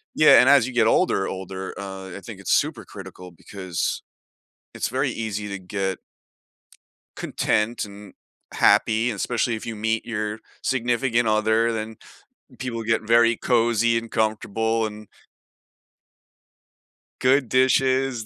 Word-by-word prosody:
yeah, 155 - +7
and 130 - +4
as 140 -4 +5
you 130 - -7
get 115 -2 +3
older, 115 - +2
older, 95 0 -6
uh, 95 -1 -7
I - - -10
think - - -10
it's - - -3
super - - 0
critical 90 -1 -11
because 90 0 -4 0.7
it's - - -2
very 130 +3 -1
easy 105 -3 -4
to 100 -1 -5
get 95 0 -3 1.2
content 110 +2 -1
and 100 0 -12 0.4
happy, 115 +2 +3
especially 115 +2 -1
if 110 - -8
you 115 - -5
meet 110 +1 -1
your 105 -2 -3 0.2
significant 120 -2 0
other, 110 +2 +2
then 110 0 -4 0.6
people 120 -3 -4
get 115 +1 +1
very 115 +1 +4
cozy, 115 -1 +2
and 115 0 -6
comfortable, 110 0 0
and 105 0 -8 2.1
Good 130 +1 +3
dishes, 130 -2 +2
110 Hz, 130 wpm, -23 LUFS, 105-120 Hz, 2.1 s, yeah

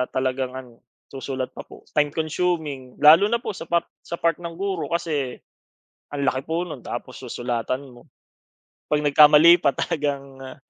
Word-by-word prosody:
talagang 130 0 -1
ano, 125 -3 -10 0.3
susulat 130 -1 -5
pa - - -9
po. - - -14
Time 150 -1 +2
consuming 155 -5 -2
lalo 160 +7 +7
na 235 +2 -1
po - - -3
sa 170 -4 -9
pa 170 0 +1 0.2
sa 170 - -6
part 170 -1 0
ng 170 -1 -7
guro 190 -1 -3
kasi 155 -7 -2 0.8
ang 140 - -2
laki 130 0 -1
po 165 +2 -1
no'n 160 -6 -7
tapos - - -7
susulatan 125 +3 -4
mo. 120 -1 -17 0.9
'Pag 150 - +3
nagkamali 150 +3 +7
pa, 145 -5 +2
talagang, 140 -3 -3
uh 130 +2 -9
150 Hz, 165 wpm, -23 LUFS, 130-170 Hz, 0.9 s, lalo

